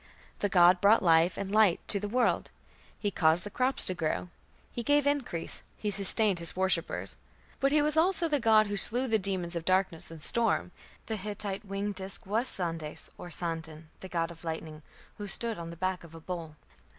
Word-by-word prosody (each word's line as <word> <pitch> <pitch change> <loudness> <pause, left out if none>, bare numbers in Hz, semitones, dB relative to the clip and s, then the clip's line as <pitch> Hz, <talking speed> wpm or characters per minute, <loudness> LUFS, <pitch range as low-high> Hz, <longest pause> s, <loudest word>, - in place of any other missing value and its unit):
The 205 - 0
god 180 -1 +5
brought 205 +2 +5
life 165 0 +4
and 200 -1 -4
light 210 -4 +4
to 200 - +2
the 205 - -4
world; 240 +3 0 0.5
he 205 - -2
caused 165 0 +3
the 205 - -6
crops 255 +4 +1
to 185 - -1
grow; 170 +1 -2 0.4
he 240 - -4
gave 290 +3 +2
increase; 270 - -1 0.2
he 210 - -2
sustained 200 -1 +3
his 170 -1 -1
worshippers. 190 +1 -1 0.4
But 275 0 +2
he 300 0 +3
was 300 0 0
also 340 +1 +3
the 295 -2 +1
god 220 -2 +5
who 205 0 -3
slew 245 +7 +5
the 220 -2 +2
demons 185 -3 -3
of 170 - -3
darkness 185 -2 0
and 165 -1 -10
storm. 230 +7 +2 0.3
The 220 - -3
Hittite 205 0 -5
winged 200 +1 -3
disk 195 +3 -5
was 220 +6 0
Sandes 165 -4 -2
or 175 - -8
Sandon, 160 -2 -5
the 190 - -9
god 165 -1 -2
of 165 0 -13
lightning, 160 -2 -6 0.4
who 205 - -5
stood 225 0 -4
on 165 0 -6
the 170 - -9
back 185 +1 -2
of 165 -1 -13
a - - -9
bull. 165 -2 -7
195 Hz, 200 wpm, -29 LUFS, 170-220 Hz, 0.5 s, god